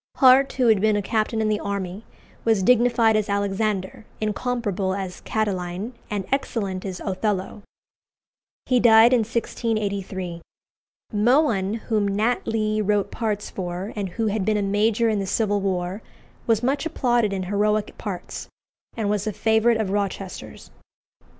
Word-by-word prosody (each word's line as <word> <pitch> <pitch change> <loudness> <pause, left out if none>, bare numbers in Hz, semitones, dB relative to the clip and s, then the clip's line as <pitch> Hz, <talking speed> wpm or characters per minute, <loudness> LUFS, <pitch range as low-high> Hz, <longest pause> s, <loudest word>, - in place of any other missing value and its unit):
Hart, 265 0 +6
who 255 - +1
had 215 -3 +4
been 215 0 +3
a 205 - +1
captain 220 +2 0
in 215 - +1
the 210 -1 +1
army, 200 0 -4 0.4
was 220 -4 +2
dignified 235 0 +4
as 215 -1 0
Alexander, 200 0 -1 0.2
incomparable 210 -3 -1
as 190 -2 -5
Catiline, 195 0 -2 0.2
and 205 -2 -3
excellent 205 -9 -2
as 185 -2 -5
Othello. 195 +1 -2 1.0
He 255 -2 +3
died 230 +1 +7
in 250 - +5
1683. 200 -6 -2 0.7
Mohun, 215 -3 +2
whom 210 -3 +1
Nat 215 +5 0
Lee 215 -1 0
wrote 205 -1 0
parts 215 -3 -3
for, 180 +2 -5
and 200 -3 -3
who 225 +6 -2
had 210 -1 0
been 215 +1 +1
a 205 - 0
major 210 +3 +2
in 215 -2 +1
the 195 - -3
Civil 205 0 +1
War, 185 +1 -2 0.5
was 225 0 +2
much 275 +5 0
applauded 240 -8 +1
in 190 -1 -2
heroic 210 +2 0
parts, 195 -4 -6 0.5
and 220 -3 -1
was 205 0 -1
a - - 0
favourite 220 +3 +2
of 215 -4 -1
Rochester's. 195 -2 -4
210 Hz, 150 wpm, -23 LUFS, 195-225 Hz, 1.0 s, died